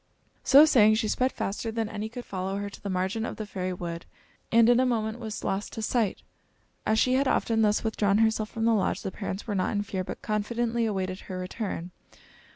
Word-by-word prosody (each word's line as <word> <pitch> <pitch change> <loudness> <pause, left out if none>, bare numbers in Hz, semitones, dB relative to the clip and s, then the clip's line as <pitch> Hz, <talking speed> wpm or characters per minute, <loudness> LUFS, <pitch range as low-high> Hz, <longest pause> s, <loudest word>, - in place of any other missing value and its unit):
So 285 +3 +8
saying, 215 -8 +5
she 215 0 0
sped 255 +4 +1
faster 220 +3 -3
than 225 -1 -2
any 215 0 -5
could 240 +2 -8
follow 190 +1 -3
her 200 0 -4
to - - -12
the 200 - -5
margin 190 +4 -1
of - - -4
the 215 - -5
fairy 185 -2 -3
wood, 170 -2 -6 0.4
and 230 0 +6
in 245 0 +5
a - - +4
moment 220 -1 -1
was 220 -2 -6
lost 195 +2 -2
to 220 - -5
sight. 220 -3 0 0.6
As 220 - +3
she 255 +3 +3
had 270 +1 +2
often 225 -3 +1
thus 210 -1 +2
withdrawn 210 -2 +1
herself 220 -1 +2
from 225 0 -2
the 230 - +4
lodge, 200 -4 0
the 195 - -3
parents 195 0 -5
were 210 - -3
not 185 +1 0
in 205 0 0
fear 190 -2 -3
but - - -8
confidently 230 +2 0
awaited 190 -2 -2
her 185 - -7
return. 185 -1 -4
215 Hz, 220 wpm, -27 LUFS, 195-230 Hz, 0.6 s, So